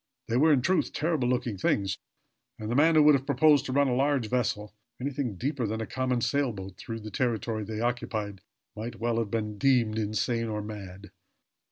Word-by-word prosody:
They 115 Hz, -, +2 dB
were, 155 Hz, +4 st, +5 dB
in 135 Hz, -4 st, +3 dB
truth, 185 Hz, +4 st, +1 dB
terrible 155 Hz, -5 st, 0 dB
looking 120 Hz, -5 st, -1 dB
things 95 Hz, 0 st, 0 dB, 0.6 s
and 110 Hz, +1 st, -5 dB
the -, -, 0 dB
man 160 Hz, +4 st, +5 dB
who 155 Hz, -, +7 dB
would 150 Hz, 0 st, +7 dB
have 135 Hz, -1 st, 0 dB
proposed 145 Hz, 0 st, +4 dB
to -, -, -3 dB
run 140 Hz, +1 st, +3 dB
a 125 Hz, -, +1 dB
large 135 Hz, -3 st, +1 dB
vessel, 105 Hz, -4 st, -1 dB, 0.3 s
anything 130 Hz, -4 st, -2 dB
deeper 130 Hz, -, -2 dB
than 110 Hz, +2 st, -3 dB
a 110 Hz, -, -2 dB
common 130 Hz, 0 st, -1 dB
sailboat, 110 Hz, -10 st, -1 dB
through 115 Hz, +4 st, -7 dB
the 110 Hz, 0 st, -8 dB
territory 110 Hz, -1 st, -1 dB
they 110 Hz, +1 st, -5 dB
occupied 110 Hz, -4 st, -2 dB, 0.3 s
might 110 Hz, 0 st, -6 dB
well 115 Hz, 0 st, 0 dB
have 115 Hz, -3 st, -2 dB
been 105 Hz, -2 st, -3 dB
deemed 120 Hz, -5 st, +3 dB
insane 110 Hz, +2 st, -1 dB
or 105 Hz, -1 st, -3 dB
mad. 100 Hz, -2 st, -9 dB
115 Hz, 195 wpm, -28 LUFS, 105-135 Hz, 0.6 s, who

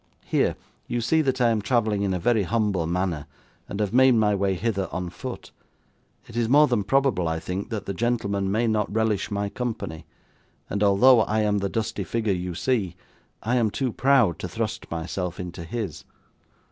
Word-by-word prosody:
Here; -, -, +1 dB, 0.3 s
you 120 Hz, -, -1 dB
see 160 Hz, +8 st, +2 dB
that 130 Hz, -3 st, 0 dB
I 120 Hz, -2 st, +4 dB
am 110 Hz, -2 st, 0 dB
travelling 110 Hz, -1 st, +1 dB
in 100 Hz, -1 st, 0 dB
a 90 Hz, -, 0 dB
very 110 Hz, +5 st, +2 dB
humble 100 Hz, -4 st, 0 dB
manner, 85 Hz, -3 st, -2 dB, 0.4 s
and 100 Hz, -, -5 dB
have 105 Hz, 0 st, -1 dB
made 130 Hz, +1 st, +6 dB
my 105 Hz, -2 st, +3 dB
way 100 Hz, -1 st, +1 dB
hither 95 Hz, -2 st, -1 dB
on 90 Hz, -1 st, -4 dB
foot. 85 Hz, -, -7 dB, 0.8 s
It 115 Hz, -, -12 dB
is 120 Hz, -1 st, 0 dB
more 145 Hz, +3 st, +7 dB
than 120 Hz, -7 st, 0 dB
probable, 125 Hz, -6 st, +2 dB
I 80 Hz, 0 st, -1 dB
think, 95 Hz, +5 st, -4 dB
that 110 Hz, -4 st, -4 dB
the 100 Hz, -, -3 dB
gentleman 100 Hz, -3 st, -1 dB
may 110 Hz, +4 st, +1 dB
not 110 Hz, -2 st, 0 dB
relish 110 Hz, -1 st, 0 dB
my 100 Hz, 0 st, -1 dB
company; 100 Hz, -9 st, -5 dB, 0.6 s
and 100 Hz, -, -1 dB
although 110 Hz, +5 st, +6 dB
I 110 Hz, 0 st, +1 dB
am 105 Hz, -1 st, +1 dB
the 100 Hz, 0 st, -1 dB
dusty 110 Hz, -1 st, -2 dB
figure 110 Hz, +1 st, -1 dB
you 90 Hz, -1 st, -4 dB
see, 100 Hz, -2 st, 0 dB, 0.5 s
I 120 Hz, +3 st, +1 dB
am 115 Hz, -3 st, +2 dB
too 125 Hz, +2 st, -2 dB
proud 130 Hz, -9 st, +3 dB
to 90 Hz, -, -5 dB
thrust 110 Hz, +4 st, -4 dB
myself 90 Hz, +2 st, -4 dB
into 90 Hz, -2 st, -6 dB
his. 95 Hz, -2 st, -5 dB
105 Hz, 190 wpm, -25 LUFS, 95-115 Hz, 0.8 s, more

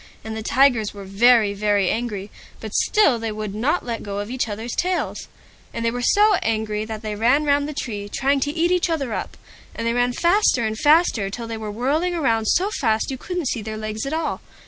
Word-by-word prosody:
And 220 Hz, 0 st, -6 dB
the 220 Hz, -, -4 dB
Tigers 235 Hz, -3 st, +2 dB
were 200 Hz, -, -8 dB
very, 210 Hz, +2 st, +4 dB
very 205 Hz, -2 st, +1 dB
angry, 215 Hz, -4 st, -4 dB, 0.3 s
but -, -, -8 dB
still 300 Hz, -, +3 dB
they 225 Hz, -1 st, -3 dB
would 215 Hz, -1 st, -5 dB
not 265 Hz, +11 st, 0 dB
let 235 Hz, -2 st, -4 dB
go 200 Hz, -1 st, -5 dB
of 205 Hz, +3 st, -4 dB
each 255 Hz, -3 st, -2 dB
other's 220 Hz, +3 st, -5 dB
tails. 365 Hz, +1 st, -2 dB, 0.5 s
And 230 Hz, -, -2 dB
they 230 Hz, -, +2 dB
were 245 Hz, +1 st, -4 dB
so 415 Hz, -, +4 dB
angry, 215 Hz, -1 st, -1 dB
that 220 Hz, 0 st, -7 dB
they 215 Hz, -1 st, -3 dB
ran 240 Hz, +8 st, +2 dB
round 285 Hz, 0 st, +1 dB
the -, -, -5 dB
tree, 205 Hz, -6 st, -5 dB
trying 275 Hz, +1 st, +1 dB
to 290 Hz, +2 st, -1 dB
eat 335 Hz, +3 st, +1 dB
each 360 Hz, -1 st, +2 dB
other 280 Hz, -8 st, -2 dB
up, -, -, -5 dB, 0.4 s
and 230 Hz, -, -4 dB
they 230 Hz, -, +1 dB
ran 245 Hz, 0 st, +1 dB
faster 340 Hz, -, +2 dB
and 220 Hz, 0 st, -2 dB
faster, 295 Hz, -, +3 dB
till 230 Hz, +4 st, -6 dB
they 230 Hz, 0 st, -5 dB
were 215 Hz, -1 st, -5 dB
whirling 295 Hz, +11 st, 0 dB
round 225 Hz, -8 st, +1 dB
so 380 Hz, -, +2 dB
fast 220 Hz, -4 st, +1 dB
that -, -, -3 dB
you -, -, -5 dB
couldn't 355 Hz, -7 st, -3 dB
see 235 Hz, -, -2 dB
their 215 Hz, 0 st, -6 dB
legs 215 Hz, 0 st, -4 dB
at -, -, -3 dB
all. 320 Hz, 0 st, -2 dB
230 Hz, 230 wpm, -22 LUFS, 215-290 Hz, 0.5 s, very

